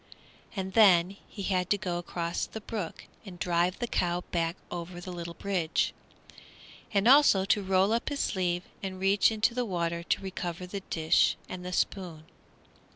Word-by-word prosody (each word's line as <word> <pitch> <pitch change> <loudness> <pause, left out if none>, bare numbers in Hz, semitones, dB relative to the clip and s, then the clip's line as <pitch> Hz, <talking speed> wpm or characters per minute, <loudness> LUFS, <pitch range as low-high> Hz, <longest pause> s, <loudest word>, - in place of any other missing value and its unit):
And 190 -1 -4
then 190 -4 +6
he 200 - -7
had 185 -2 0
to 205 - +3
go 180 -3 -2
across 170 -1 -3
the 220 - -7
brook 205 -5 -5 0.2
and 190 -4 -10
drive 175 +1 +1
the 240 - -2
cow 175 -6 0
back 165 -1 0 0.2
over 175 0 -6
the 180 +1 -7
little 170 -1 -6
bridge, 185 -5 0 1.0
and 200 0 +2
also 255 -8 +6
to 205 +1 +2
roll 190 +2 +2
up 235 - 0
his 285 -1 -3
sleeve 175 -2 0 0.2
and 190 -1 -5
reach 195 +3 +4
into 220 +2 +1
the 250 +1 0
water 170 -5 -2
to 170 - -1
recover 180 -2 -4
the 195 +2 -5
dish 160 -1 +3
and 180 -1 -7
the 180 - -5
spoon. 175 -4 -2
185 Hz, 170 wpm, -29 LUFS, 175-200 Hz, 1.0 s, then